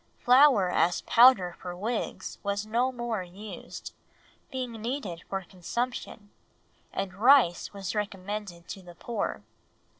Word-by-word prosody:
Flour 250 -7 +5
as 175 0 +2
powder 230 -8 +6
for 180 -1 -6
wigs 220 +5 -4
was 200 0 -2
no 240 +4 +1
more 240 -4 -3
used, 190 +4 -9 0.6
being 255 -2 -4
needed 225 -8 -4
for 195 -1 -2
consumption, 205 +3 -5 0.6
and 195 -1 -3
rice 225 -4 +4
was 195 -2 -5
recommended 200 -3 -4
to 195 - -6
the 175 -1 -13
poor. 225 +2 -3
205 Hz, 120 wpm, -28 LUFS, 185-240 Hz, 0.6 s, powder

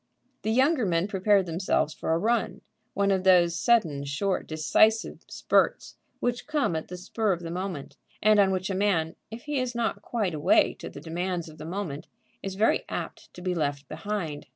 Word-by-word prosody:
The 215 - -2
younger 260 +4 +3
men 175 -1 +1
prepared 200 0 +3
themselves 165 -2 0
for - - -3
a 165 - +3
run, 225 +5 0 0.3
one 200 0 +2
of 190 -1 +1
those 175 -3 +5
sudden, 170 -10 +2
short, 150 +8 -1
decisive 215 +8 +2
spurts - - +1 0.2
which 245 +2 -2
come 295 - 0
at 160 - -3
the 180 - -7
spur 205 +3 0
of 175 - -5
the 165 -1 -6
moment, 180 -5 -5 0.2
and 215 0 +4
on 195 -1 +5
which 190 +1 -1
a - - -1
man, 185 -5 +1
if 225 +2 -9
he 295 -2 -1
is 250 -1 -2
not 235 -1 -1
quite 210 -7 -2
awake 150 -1 +3
to - - -7
the 140 - -10
demands 175 +2 -3
of 155 0 -14
the 155 - -7
moment, 170 -5 -5 0.3
is 195 -1 -5
very 215 +3 +2
apt - - -6
to 180 - -10
be 185 -1 0
left 145 -4 -2
behind. 175 -8 -4
185 Hz, 195 wpm, -27 LUFS, 165-215 Hz, 0.3 s, those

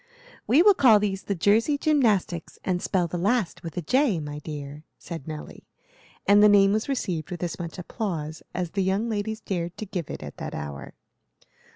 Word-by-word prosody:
"We 285 +9 +6
will 410 +1 +7
call 235 - +6
these 195 -2 -1
the 200 - -3
Jersey 220 - +3
Jymnastics, 220 - +1
and 180 -1 0
spell 185 -2 +1
the 175 +1 -4
last 205 0 0
with 165 +1 -8
a 175 - -2
J, 255 - +2
my 150 -1 -6
dear," 150 -1 -7
said 165 -4 -8
Nelly; 155 -1 -8 0.6
and 205 +1 +7
the 210 - +8
name 200 -1 +5
was 215 +5 -1
received 180 - -2
with 180 -2 -5
as 175 - -3
much 170 0 -6
applause 165 -5 -4
as 175 -2 -3
the 200 - -1
young 195 +5 0
ladies 220 +1 -3
dared 175 -3 -3
to 215 - -5
give 185 -5 -5
it - - -6
at 75 - -9
that - - -5
hour. 70 -1 -7
190 Hz, 195 wpm, -26 LUFS, 165-215 Hz, 0.6 s, the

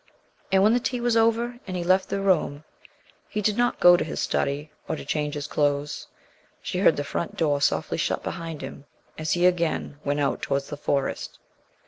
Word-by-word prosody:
And 190 0 +5
when 215 +2 +5
the 245 - +3
tea 250 0 -2
was 240 -1 +1
over 230 +2 +2
and 185 -1 -3
he 175 - -2
left 185 +2 +2
the 200 - -1
room, 160 -6 +1 0.7
he 210 - -2
did 210 0 +1
not 245 +1 +1
go 175 0 +8
to - - 0
his 160 - -5
study, 145 +2 -1 0.2
or 160 - -1
to - - -8
change 150 0 -1
his 145 -1 -4
clothes. 145 0 -1 0.5
She 180 - -3
heard 185 -4 +5
the 145 - -1
front 170 - -4
door 145 -3 +1
softly - - +1
shut - - -1
behind 165 -3 -5
him 140 - -8 0.3
as 155 0 0
he 175 0 +2
again 170 -4 +1
went 145 +1 0
out 140 -1 0
towards 140 0 -1
the - - -2
Forest. 140 -1 -2
165 Hz, 200 wpm, -25 LUFS, 145-195 Hz, 0.7 s, go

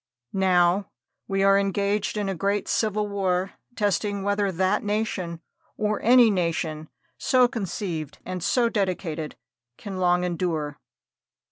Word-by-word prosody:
Now, 185 0 +3 0.4
we 195 0 +1
are 195 0 +5
engaged 200 +1 0
in 205 -1 -1
a 195 - -1
great 200 +3 -1
civil 210 -1 0
war, 190 -2 -1 0.2
testing 205 -1 0
whether 200 0 +1
that 190 +3 +1
nation, 205 -5 -2 0.4
or 210 0 0
any 240 -1 +6
nation, 165 -4 -2 0.3
so 255 -1 +4
conceived 185 - -4
and 180 -2 -4
so 240 +4 +3
dedicated, 180 -7 -2 0.4
can 195 -2 -7
long 180 -1 +2
endure. 165 -4 -2
195 Hz, 125 wpm, -25 LUFS, 175-205 Hz, 0.4 s, any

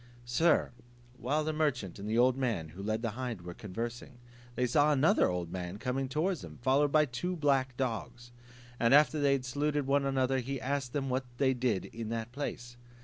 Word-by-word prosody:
Sir, 140 +8 +2 0.5
while 150 +5 0
the 155 +1 -1
merchant 135 - -1
and 100 +2 -5
the 110 - +1
old 125 +1 +5
man 115 -12 -1
who 90 +5 -10
led 110 +3 -2
the 115 - -1
hind 120 -3 -4
were 90 0 -7
conversing, 115 +6 -6 0.4
they 125 - +1
saw 145 +5 +3
another 150 +2 +4
old 90 -2 -3
man 90 +1 -5
coming 130 +3 -2
towards 165 +5 0
them, - - -10
followed 140 +3 +3
by 155 0 +5
two 175 +8 -3
black 135 -5 +1
dogs; 120 -1 -4 0.5
after 145 +6 +5
they 140 -1 +3
had 130 -2 -1
saluted 145 +2 -1
one 140 +1 +2
another, 135 -1 +1
he 135 +2 -4
asked 135 -2 -2
them 140 -2 -1
what 130 +1 -1
they 130 0 +3
did 120 -6 0
in 115 -1 -6
that 115 0 -3
place? 120 -3 -5
130 Hz, 195 wpm, -31 LUFS, 115-140 Hz, 0.5 s, old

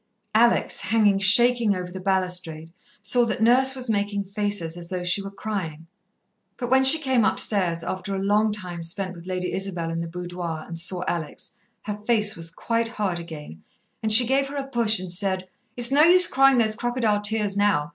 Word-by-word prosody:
Alex, 235 +2 +2
hanging 205 +2 +1
shaking 230 +2 +4
over 180 -1 -6
the 190 - -8
balustrade, 180 -4 -2 0.3
saw 245 -1 +3
that 230 -2 -3
Nurse 255 +4 +3
was 255 -1 -5
making 205 -2 -2
faces 200 -4 -3
as 170 -1 -9
though 180 -1 -4
she 180 +3 +2
were 195 - -7
crying. 190 -6 -6 0.7
But 245 -1 -6
when 265 0 +4
she 265 +4 +8
came 265 -6 0
upstairs, 180 -6 0
after 185 +3 -5
a - - -3
long 210 +2 +1
time 180 -5 -6
spent 185 +3 -1
with 170 0 -13
Lady 180 -1 -4
Isabel 180 -4 -4
in 165 0 -4
the 170 - -5
boudoir, 175 -2 -6
and 165 -1 -8
saw 180 +1 -1
Alex, 160 -4 -6 0.3
her 210 -1 -5
face 215 -2 +1
was 165 0 -4
quite 230 +6 -2
hard 205 -6 -3
again, 150 - -11 0.4
and 220 - -2
she 235 +3 +9
gave 270 +3 0
her 285 +1 -8
a 275 - -4
push 235 -6 +2
and 185 -1 -6
said, 190 0 -1 0.3
"It's 240 +1 +4
no 285 +2 +4
use 355 +3 +6
crying 270 -3 +3
those 220 -2 +1
crocodile 235 -3 -1
tears 210 -1 -1
now. 200 -8 0
200 Hz, 195 wpm, -23 LUFS, 180-230 Hz, 0.7 s, she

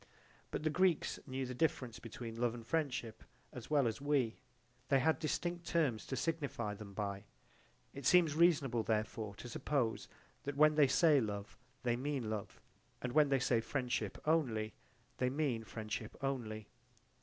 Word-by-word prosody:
But - - -3
the 155 - +2
Greeks 180 0 +2
knew 130 0 -2
the 125 - -5
difference 125 -4 0
between 115 0 -7
love 120 -1 +1
and 115 -1 -9
friendship 130 -6 -2 0.3
as 125 - -8
well 145 -4 +4
as 115 +3 -3
we 140 -6 +1 0.5
they 140 - +4
had 160 +5 +2
distinct 170 +2 -2
terms 145 -10 +1
to 130 - -2
signify 140 -7 -2
them 100 -1 -10
by: 100 -1 -3 0.7
it 140 -2 -3
seems 175 -4 +6
reasonable 145 -8 +4
therefore 110 -1 -1
to 120 - -8
suppose 120 -2 -1 0.3
that 140 0 -4
when 155 +1 +6
they 150 -2 +5
say 150 0 +5
love 100 -2 -4 0.3
they 120 -1 +2
mean 130 -3 -2
love, 105 -2 -5 0.4
and 125 - -3
that - - -9
when 150 -2 +6
they 135 - +4
say 125 -3 +2
friendship 125 0 -2
only 120 -9 +1 0.4
they 125 - +2
mean 135 -5 0
friendship 110 -1 -5
only. 110 -6 -2
130 Hz, 165 wpm, -36 LUFS, 115-150 Hz, 0.7 s, seems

